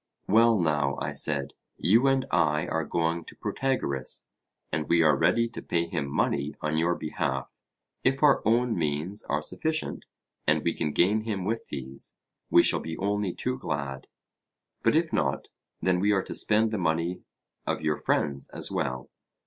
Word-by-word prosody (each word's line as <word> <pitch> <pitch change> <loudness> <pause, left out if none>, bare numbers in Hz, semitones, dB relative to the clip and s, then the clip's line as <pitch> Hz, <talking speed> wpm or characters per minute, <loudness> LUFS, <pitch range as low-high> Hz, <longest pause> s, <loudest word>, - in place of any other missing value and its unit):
Well 115 +1 +5
now, 75 -4 +1
I - - -2
said, 70 -2 0 0.2
you 115 +9 +4
and 135 -1 +2
I 75 -3 +2
are 80 0 -1
going 85 0 0
to - - -12
Protagoras, 95 - -2 0.5
and 75 0 -2
we 85 -1 +5
are 75 -2 +5
ready 115 +11 +3
to 115 - -7
pay 85 0 0
him 75 -4 -3
money 70 +1 0
on 75 0 -1
your 85 +2 +2
behalf. 75 -5 -3 0.5
If 135 +2 +1
our 145 -3 +6
own 115 +2 +2
means 80 +5 -2
are 75 +1 -1
sufficient, 155 - -2 0.4
and - - +3
we - - +1
can 75 - -2
gain 100 +8 +3
him 100 -5 -2
with 115 +3 -2
these, 65 0 -7 0.3
we - - +6
shall - - +2
be 80 0 -6
only 100 -1 0
too 125 +7 -3
glad; 70 - -4 0.7
but - - +3
if 160 0 +1
not, 70 -2 0 0.3
then 90 -1 +3
we 100 +3 +3
are 95 -1 +1
to - - -6
spend 110 +1 +2
the 110 - -1
money 85 +1 0 0.5
of - - -1
your 75 -1 0
friends 70 -2 0
as - - -4
well. 65 0 -2
85 Hz, 175 wpm, -27 LUFS, 75-110 Hz, 0.7 s, our